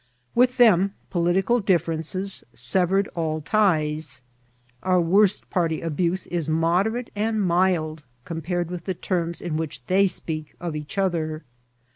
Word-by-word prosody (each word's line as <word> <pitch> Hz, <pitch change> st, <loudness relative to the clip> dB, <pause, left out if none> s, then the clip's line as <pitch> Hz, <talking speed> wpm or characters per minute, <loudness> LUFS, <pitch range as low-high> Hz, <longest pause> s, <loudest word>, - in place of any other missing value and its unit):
With 250 Hz, +1 st, +3 dB
them 200 Hz, -5 st, +5 dB, 0.2 s
political 190 Hz, +7 st, +2 dB
diffiarences 180 Hz, +1 st, -1 dB
severed 190 Hz, +1 st, +2 dB
all 160 Hz, -2 st, -2 dB
ties. 155 Hz, -7 st, 0 dB, 0.6 s
Our 185 Hz, -1 st, +2 dB
worst 190 Hz, +4 st, +3 dB
party 165 Hz, -4 st, 0 dB
abuse 170 Hz, +3 st, -1 dB
is 170 Hz, -3 st, -2 dB
moderate 180 Hz, +10 st, +1 dB
and 220 Hz, +1 st, 0 dB
mild 175 Hz, -4 st, +1 dB, 0.2 s
compared 175 Hz, +1 st, -3 dB
with 175 Hz, -2 st, -6 dB
the 185 Hz, -, -2 dB
terms 170 Hz, -2 st, -2 dB
in 165 Hz, -3 st, -2 dB
which 145 Hz, -5 st, -5 dB
they 195 Hz, +2 st, +4 dB
speak 155 Hz, -4 st, -5 dB
of 170 Hz, -3 st, -4 dB
each 150 Hz, +3 st, -6 dB
other. 165 Hz, -5 st, -1 dB
175 Hz, 130 wpm, -24 LUFS, 160-195 Hz, 0.6 s, them